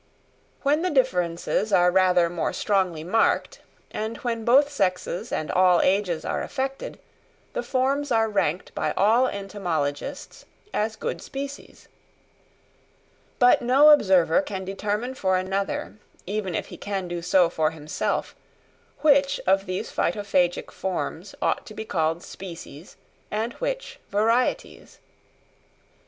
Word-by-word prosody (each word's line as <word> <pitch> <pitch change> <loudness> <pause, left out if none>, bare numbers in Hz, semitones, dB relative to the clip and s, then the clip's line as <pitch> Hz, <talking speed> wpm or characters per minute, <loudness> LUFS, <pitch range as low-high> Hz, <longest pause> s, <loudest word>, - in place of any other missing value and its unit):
When 290 +3 +2
the 365 - 0
differences 185 - 0
are 180 -2 +5
rather 180 -2 +4
more 170 -1 -2
strongly 185 -6 0
marked, 220 +7 +1 0.3
and 220 +2 -4
when 230 -2 -3
both 265 +5 +5
sexes 185 -3 -1
and 155 - -2
all 180 -1 +4
ages 185 -4 +1
are - - -2
affected, 270 0 -4 0.6
the - - -1
forms 275 - 0
are 225 -1 +3
ranked 190 -5 -1
by - - -1
all 225 +6 +4
entomologists 175 - -4 0.3
as 220 +1 -1
good - - -4
species. 275 +1 -8 1.5
But 245 0 +5
no 270 +5 +6
observer 190 - +4
can 190 -8 -5
determine 210 +6 -3
for 190 -7 +1
another, 195 +2 -3 0.3
even 195 -2 -3
if - - -3
he - - -9
can 195 -3 -4
do 175 0 -4
so 180 +1 +4
for 160 -2 0
himself, 155 -1 -3 0.7
which 280 -2 +4
of 195 +1 +2
these 185 0 -4
Phytophagic 185 -4 0
forms 190 0 -4
ought - - +1
to 215 - -10
be 220 - -5
called 165 -2 -1
species 170 -3 -10 0.3
and 220 +3 -2
which - - -4
varieties. 225 +5 0
Mr. - - -37
200 Hz, 130 wpm, -25 LUFS, 180-240 Hz, 1.5 s, no